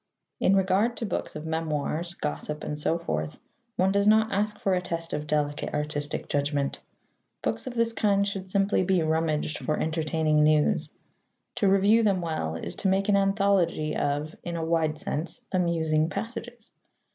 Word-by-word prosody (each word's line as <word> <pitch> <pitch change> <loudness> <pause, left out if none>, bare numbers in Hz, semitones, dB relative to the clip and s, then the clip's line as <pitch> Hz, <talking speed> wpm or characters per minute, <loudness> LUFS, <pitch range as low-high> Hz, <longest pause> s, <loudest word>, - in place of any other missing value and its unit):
In 195 - +4
regard 195 +5 +2
to 230 - -3
books 210 - -3
of 150 +1 -6
memoirs, 160 +1 -2
gossip, 110 - -4
and 150 - -3
so 150 +2 0
forth, 75 - -3 0.4
one 190 +1 +2
does 200 +1 +2
not 220 +1 +5
ask 210 +1 0
for 195 - 0
a 180 - +1
test 165 -2 -4
of 150 0 -3
delicate 145 -1 -1
artistic 150 0 -3
judgment. 145 -1 -1 0.6
Books - - -2
of 250 - -5
this 230 -1 +1
kind 200 -2 +2
should 195 -2 -5
simply 195 +1 +2
be 185 -2 +2
rummaged 155 -1 0
for 155 - -1
entertaining 155 -1 +1
"news." 150 0 +3 0.7
To 200 - +3
review 200 +4 +5
them 200 -4 +2
well 155 - -2
is 80 - -5
to - - 0
make 195 +2 +2
an 205 - +5
anthology 195 -6 +2
of 145 +2 -1
(in 170 -1 -5
a 165 -1 -2
wide 160 -2 +1
sense) 175 +2 -4
amusing 165 -4 +1
passages. 230 +2 -6
170 Hz, 170 wpm, -27 LUFS, 155-200 Hz, 0.7 s, not